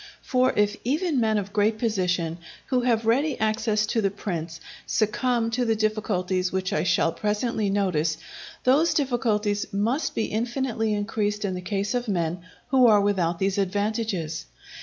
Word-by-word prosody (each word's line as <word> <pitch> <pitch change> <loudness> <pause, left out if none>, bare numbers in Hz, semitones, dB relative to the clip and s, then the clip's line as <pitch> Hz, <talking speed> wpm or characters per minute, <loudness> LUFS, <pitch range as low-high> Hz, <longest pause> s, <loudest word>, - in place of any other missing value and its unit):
For 255 0 +2
if 210 0 +2
even 300 +3 0
men 220 -2 +2
of 200 0 -4
great 215 +1 +2
position, 180 -7 -1 0.3
who 255 -2 +2
have 230 -2 +1
ready 270 +6 +2
access 215 -1 +1
to 225 +1 0
the 200 - +2
prince, 170 -5 -5 0.3
succumb 230 +2 +1
to 245 +2 0
the 225 -2 +1
difficulties 195 -4 0
which 190 +1 -1
I - - +1
shall 165 - +2
presently 210 +2 -1
notice, 175 -6 +1 0.5
those 300 +6 +3
difficulties 225 -7 0
must 225 +10 0
be 225 - 0
infinitely 235 0 -1
increased 210 0 -1
in 190 - -1
the 180 - -4
case 200 +2 -2
of 245 -1 -1
men 175 -3 -1 0.3
who 255 -2 +5
are 210 -2 +6
without 185 -4 +1
these 195 +2 0
advantages. 200 - -2
210 Hz, 160 wpm, -25 LUFS, 195-235 Hz, 0.5 s, are